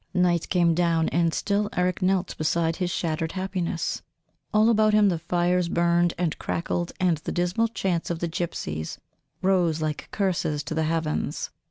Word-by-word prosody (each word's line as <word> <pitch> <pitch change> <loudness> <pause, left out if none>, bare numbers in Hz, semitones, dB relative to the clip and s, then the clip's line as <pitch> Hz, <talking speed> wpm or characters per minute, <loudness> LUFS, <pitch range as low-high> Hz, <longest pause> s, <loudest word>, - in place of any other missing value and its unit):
Night 175 -2 +2
came 170 -2 +3
down 165 -1 +2
and 170 0 +2
still 205 +4 0
Eric 180 +2 0
knelt 185 0 +1
beside 165 +1 0
his 180 -2 -1
shattered 165 -2 -2
happiness. 185 -3 -2 0.5
All 215 +2 +4
about 215 -1 +4
him 210 -1 +5
the 170 -3 -1
fires 175 +1 +1
burned 170 0 +2
and 170 -3 -1
crackled, 175 +1 -2
and 180 -3 +2
the 150 - -5
dismal 180 +6 +1
chants 190 -6 -2
of 170 - -1
the 170 - -2
gypsies 160 - -4 0.5
rose 180 -4 +2
like 155 -1 -3
curses 175 -7 -1
to - - -4
the 160 0 0
heavens. 155 -2 -2
175 Hz, 165 wpm, -25 LUFS, 165-185 Hz, 0.5 s, him